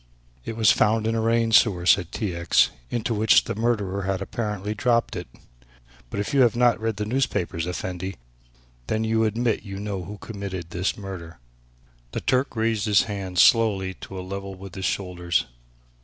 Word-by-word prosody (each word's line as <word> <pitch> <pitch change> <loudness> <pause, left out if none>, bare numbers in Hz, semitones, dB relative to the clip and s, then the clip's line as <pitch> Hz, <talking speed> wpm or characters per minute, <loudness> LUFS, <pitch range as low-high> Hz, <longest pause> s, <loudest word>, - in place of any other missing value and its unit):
"It 115 - -5
was 110 -2 +6
found 110 +1 +2
in 115 - +1
a 115 - 0
rain 115 0 +2
sewer," 95 -6 +4
said 90 -1 +4
T. 100 -6 -3
X., 85 0 +3 0.2
"into 120 0 -1
which 110 0 +5
the - - -3
murderer 105 -4 -1
had 95 0 -1
apparently 105 0 -3
dropped 115 +2 +1
it. - - -5 0.8
But 100 - -4
if 100 +8 -3
you 140 - +5
have 120 -3 +4
not 120 -1 +3
read 115 -1 -1
the 105 - -2
newspapers, 105 -9 -1
Effendi, 90 +1 -4 0.7
then 110 0 0
you 110 0 +2
admit 115 +1 +1
that 105 - -16
you 95 0 -5
know 100 -3 -4
who 105 +2 -8
committed 100 -6 -6
this 90 +7 -1
murder." 90 -5 -8 0.8
The - - -2
Turk 130 +1 +1
raised 110 -2 0
his 105 -2 +5
hands 95 -4 +1
slowly 100 -5 +3
to 95 - -7
a 90 - -6
level 100 0 -6
with 95 -1 -10
his 95 -1 -4
shoulders. 90 -4 -1
105 Hz, 185 wpm, -24 LUFS, 95-115 Hz, 0.8 s, was